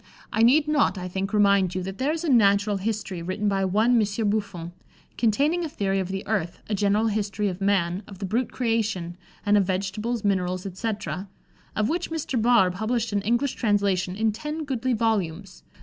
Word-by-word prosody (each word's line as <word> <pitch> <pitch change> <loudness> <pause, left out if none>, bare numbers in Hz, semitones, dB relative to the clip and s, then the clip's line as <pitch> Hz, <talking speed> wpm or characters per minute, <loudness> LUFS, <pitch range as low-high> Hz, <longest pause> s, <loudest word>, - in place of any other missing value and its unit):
I 220 - +2
need 285 +6 +5
not, 295 -9 +2
I 180 0 -4
think, 190 +2 -3
remind 200 -3 +3
you 185 - -2
that 195 +1 -6
there 275 +3 +1
is 325 +1 -3
a 330 - -1
natural 205 -4 +4
history 200 -3 -3
written 185 +5 -2
by 195 -1 +1
one 220 +6 +3
Monsieur 210 +1 0
Buffon, 200 -5 -2 0.4
"containing 285 +10 +2
a 325 - -3
theory 195 -7 -1
of 190 - -2
the 195 +1 -4
earth, 195 -6 -1
a 215 - -2
general 205 +2 +2
history 210 -1 -1
of 185 +1 -7
man, 190 -2 +1
of 195 - -10
the 195 - -4
brute 230 +6 -1
creation, 215 -8 -1 0.3
and 205 0 +4
of 200 - +3
vegetables, 200 +5 -2
minerals, 185 -2 0
etc.," 200 0 -4 0.5
of 215 0 +1
which 345 +4 -2
Mr. 295 -7 -2
Barr 230 -5 +4
published 220 +3 -2
an 200 - +1
English 240 +6 +1
translation 200 -4 +1
in 220 +1 +1
ten 300 +9 -5
goodly 260 -2 -1
volumes. 195 -5 -1
205 Hz, 190 wpm, -25 LUFS, 190-230 Hz, 0.5 s, need